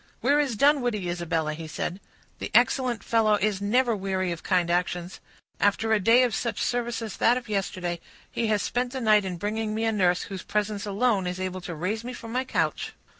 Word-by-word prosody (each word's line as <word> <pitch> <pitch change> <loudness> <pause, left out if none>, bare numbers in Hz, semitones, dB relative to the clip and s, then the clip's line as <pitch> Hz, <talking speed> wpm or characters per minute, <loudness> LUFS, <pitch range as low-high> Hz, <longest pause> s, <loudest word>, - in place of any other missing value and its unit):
"Where 280 +5 +3
is 275 -6 0
Dunwoodie, 245 -8 +2
Isabella?" 165 -3 -1
he 160 +1 -7
said. 170 +4 -4 0.4
"The - - -4
excellent 240 -1 +3
fellow 220 -2 +3
is 205 -1 0
never 235 +3 +2
weary 190 -2 -1
of 170 - -5
kind 180 -2 +1
actions. 175 0 -1 0.4
After 220 +2 +2
a 215 - +4
day 230 +6 +5
of 245 -3 +1
such 235 - -2
service 240 -1 -1
as 220 - -6
that 240 +2 +4
of 245 -2 -6
yesterday, 185 -4 -2 0.3
he 230 - -1
has 210 -2 +1
spent 245 +1 -1
the 265 - -3
night 215 -3 +4
in 180 -2 -4
bringing 215 +3 -2
me 220 - -1
a 225 - +2
nurse, 180 -4 +2
whose 190 -2 -6
presence 210 -1 -2
alone 205 -2 +1
is 180 +1 -4
able 185 0 -3
to 175 -1 -6
raise 195 +8 -2
me 250 +1 -6
from 230 -2 -8
my 255 +2 0
couch." 165 - -1
210 Hz, 210 wpm, -26 LUFS, 185-235 Hz, 0.4 s, day